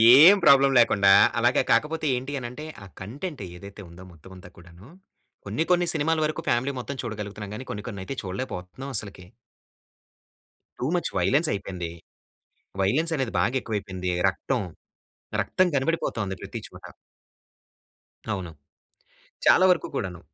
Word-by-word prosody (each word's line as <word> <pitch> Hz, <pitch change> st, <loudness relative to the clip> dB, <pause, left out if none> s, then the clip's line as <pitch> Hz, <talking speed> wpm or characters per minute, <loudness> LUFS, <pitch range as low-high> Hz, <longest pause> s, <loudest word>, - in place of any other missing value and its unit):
ఏం 165 Hz, +9 st, +9 dB
ప్రాబ్లమ్ 140 Hz, 0 st, +6 dB
లేకుండా 100 Hz, -4 st, +5 dB, 0.3 s
అలాగే 120 Hz, +2 st, +3 dB
కాకపోతే 155 Hz, +1 st, +1 dB
ఏంటి 130 Hz, +3 st, -5 dB
అనేంటే, 125 Hz, +5 st, -7 dB, 0.2 s
ఆ -, -, -10 dB, 0.2 s
కంటెంట్ 140 Hz, -, -6 dB
ఏదైతే 100 Hz, +3 st, -11 dB
ఉందో 85 Hz, +2 st, -13 dB
మొత్తం 85 Hz, +2 st, -16 dB
అంతా 90 Hz, -, -13 dB
కూడాను 85 Hz, +4 st, -15 dB, 0.6 s
కొన్ని 160 Hz, -, -1 dB
కొన్ని 175 Hz, 0 st, +4 dB
సినిమాల 160 Hz, +1 st, +1 dB
వరకు 155 Hz, 0 st, -3 dB
ఫ్యామిలీ 125 Hz, +4 st, +1 dB
మొత్తం 135 Hz, +2 st, -6 dB
చూడగలుగుతున్నాం 105 Hz, -2 st, -6 dB
గానీ, 130 Hz, -, -7 dB
కొన్ని 105 Hz, +1 st, -6 dB
కొన్నయితే 100 Hz, +3 st, -6 dB
చూడలేకపోతున్నాం 95 Hz, +5 st, -6 dB
అసలకి. 100 Hz, -4 st, -7 dB, 1.5 s
టూ -, -, -2 dB
ముచ్ 175 Hz, -, -1 dB
వయలెన్స్ 135 Hz, -, +2 dB
అయిపోయింది. 90 Hz, -4 st, -5 dB, 0.9 s
వయలెన్స్ 155 Hz, +13 st, +1 dB
అనేది 130 Hz, -5 st, -2 dB
బాగా 125 Hz, -, +1 dB
ఎక్కువైపోయింది. 95 Hz, -5 st, -4 dB, 0.2 s
రక్తం, 115 Hz, +6 st, -2 dB, 0.8 s
రక్తం 185 Hz, -, +2 dB
కనపడిపోతుంది 130 Hz, -9 st, -1 dB
ప్రతి -, -, -6 dB
చోట. -, -, -15 dB, 1.5 s
అవును. 90 Hz, -4 st, -5 dB, 0.9 s
చాలా 185 Hz, -, +6 dB
వరకు 180 Hz, -, 0 dB
కూడాను. 90 Hz, -7 st, -3 dB
115 Hz, 125 wpm, -25 LUFS, 95-140 Hz, 1.5 s, ఏం